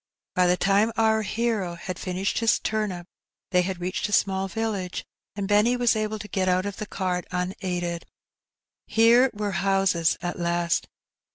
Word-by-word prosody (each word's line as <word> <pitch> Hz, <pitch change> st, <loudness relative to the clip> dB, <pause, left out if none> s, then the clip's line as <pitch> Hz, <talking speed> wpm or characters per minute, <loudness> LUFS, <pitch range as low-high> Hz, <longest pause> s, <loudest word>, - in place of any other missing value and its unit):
By 180 Hz, 0 st, +3 dB
the 180 Hz, 0 st, +3 dB
time 200 Hz, +4 st, +3 dB
our 220 Hz, -1 st, +3 dB
hero 215 Hz, -4 st, -1 dB
had 180 Hz, +1 st, -6 dB
finished 185 Hz, +1 st, -1 dB
his 230 Hz, -1 st, +3 dB
turnip 210 Hz, -5 st, -2 dB, 0.5 s
they 180 Hz, -1 st, +4 dB
had 185 Hz, 0 st, -3 dB
reached 185 Hz, +3 st, -2 dB
a -, -, -7 dB
small 195 Hz, -1 st, +2 dB
village, 200 Hz, -3 st, -3 dB, 0.3 s
and 200 Hz, -1 st, -3 dB
Benny 210 Hz, +4 st, +3 dB
was 245 Hz, -2 st, +3 dB
able 215 Hz, 0 st, -1 dB
to 210 Hz, 0 st, -8 dB
get 185 Hz, -1 st, 0 dB
out 185 Hz, +1 st, +2 dB
of 200 Hz, -1 st, -4 dB
the 215 Hz, -, -5 dB
cart 180 Hz, -3 st, -2 dB
unaided. 180 Hz, -1 st, -3 dB, 0.8 s
Here 235 Hz, +3 st, +5 dB
were 205 Hz, -1 st, -3 dB
houses 195 Hz, -3 st, +2 dB
at 175 Hz, 0 st, -4 dB
last. 170 Hz, 0 st, 0 dB
195 Hz, 165 wpm, -25 LUFS, 180-215 Hz, 0.8 s, Here